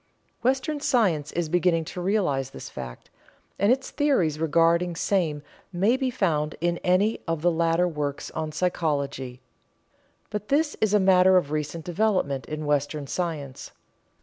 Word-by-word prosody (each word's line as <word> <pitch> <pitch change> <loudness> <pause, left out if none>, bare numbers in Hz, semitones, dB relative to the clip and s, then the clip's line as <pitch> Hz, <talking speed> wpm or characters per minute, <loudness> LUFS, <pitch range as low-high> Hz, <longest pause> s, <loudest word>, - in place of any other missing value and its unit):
Western 270 +4 0
science 210 - +1
is 170 -1 -1
beginning 170 0 +2
to 180 - -6
realize 175 -9 0
this - - -9
fact, - - -9 0.5
and 200 +3 +4
its 265 +1 0
theories 190 - +1
regarding 165 +2 +2
same 165 -5 0 0.3
may 200 +7 +2
be 260 -1 -1
found 155 -10 0
in 170 0 0
any 190 +5 +2
of 165 -1 -2
the 175 - +4
later 165 +1 +2
works 150 -4 -4
on 155 -1 -4
psychology. 140 -6 -2 0.9
But 210 0 -4
this 295 +2 +1
is 215 -1 +3
a - - +5
matter 190 -1 +5
of 150 -5 0
recent 155 +1 -3
development 175 - 0
in 155 0 -5
Western 145 0 -1
science. 150 -4 -4
170 Hz, 150 wpm, -25 LUFS, 150-200 Hz, 0.9 s, a